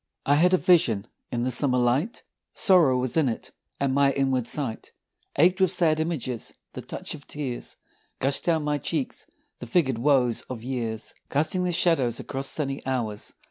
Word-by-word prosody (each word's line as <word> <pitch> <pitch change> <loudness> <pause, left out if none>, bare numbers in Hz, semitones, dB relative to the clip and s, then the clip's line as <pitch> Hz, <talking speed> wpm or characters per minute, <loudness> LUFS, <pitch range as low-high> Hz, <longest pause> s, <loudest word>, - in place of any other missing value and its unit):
I 140 - +4
had 170 +5 +4
a 185 - +5
vision 125 - +3 0.3
in 120 -1 -1
the 130 - 0
summer 125 0 +3
light 125 - 0 0.3
Sorrow 175 - +4
was 125 -1 -1
in 155 -5 +3
it, 115 - -5 0.3
and 140 -1 +1
my 140 0 +3
inward 130 -3 0
sight 130 -6 -3 0.4
Ached 180 +5 +4
with 190 - +5
sad 165 -4 +2
images. 150 -8 -3 0.2
The - - -6
touch - - -6
of 145 -2 -11
tears 135 -5 -4 0.4
Gushed 135 +1 0
down 160 -3 +2
my 150 0 0
cheeks: 145 -5 -3 0.3
the 120 - -8
figured 130 -3 +1
woes 125 -3 +2
of 120 -3 -6
years 120 -4 -3 0.2
Casting 160 +6 +1
their 180 - 0
shadows 140 -9 +2
across 135 0 -3
sunny 140 -2 0
hours. 115 -6 -3
135 Hz, 175 wpm, -25 LUFS, 125-160 Hz, 0.4 s, a